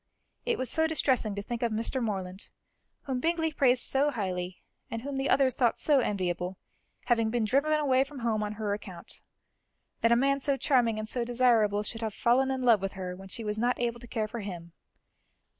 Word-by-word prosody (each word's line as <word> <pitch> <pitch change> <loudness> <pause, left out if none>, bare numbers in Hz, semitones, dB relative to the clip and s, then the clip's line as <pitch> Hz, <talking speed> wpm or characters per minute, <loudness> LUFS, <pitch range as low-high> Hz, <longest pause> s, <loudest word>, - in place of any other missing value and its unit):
It 480 - +1
was 255 - -2
so 320 +7 +1
distressing 260 -9 +1
to 200 - -4
think 235 +2 -5
of 235 -2 +1
Mr. 230 +4 -1
Morland, 190 -3 -4 0.5
whom 265 -2 -2
Bingley 325 +2 0
praised 255 -3 +3
so 280 +2 +2
highly 185 -7 -4 0.3
and 230 0 -5
whom 280 0 -4
the 270 +1 -1
others 265 -2 +4
thought 240 -2 +2
so 290 -3 +3
enviable, 185 -4 -2 0.5
having 230 -2 +2
been 235 -1 0
driven 280 +8 +2
away 270 -4 +3
from 280 +1 -11
home 225 -2 0
on 210 0 -2
her 210 -1 -2
account; 185 -4 -8 0.8
that 230 - +3
a - - +7
man 275 +3 +2
so 280 0 +1
charming 245 -6 +2
and 215 0 -4
so 240 +2 -2
desirable 230 -4 +3
should 225 +2 -6
have 220 -2 -3
fallen 260 +3 +3
in 265 -1 -2
love 230 -5 +5
with 195 0 -3
her 185 -2 -5
when 190 +1 -11
she 225 +4 -6
was 210 0 -2
not 245 +2 +1
able 235 -1 -1
to 240 - -11
care 220 -2 -2
for 235 +2 -6
him. 175 -5 -7
235 Hz, 210 wpm, -29 LUFS, 210-265 Hz, 0.8 s, a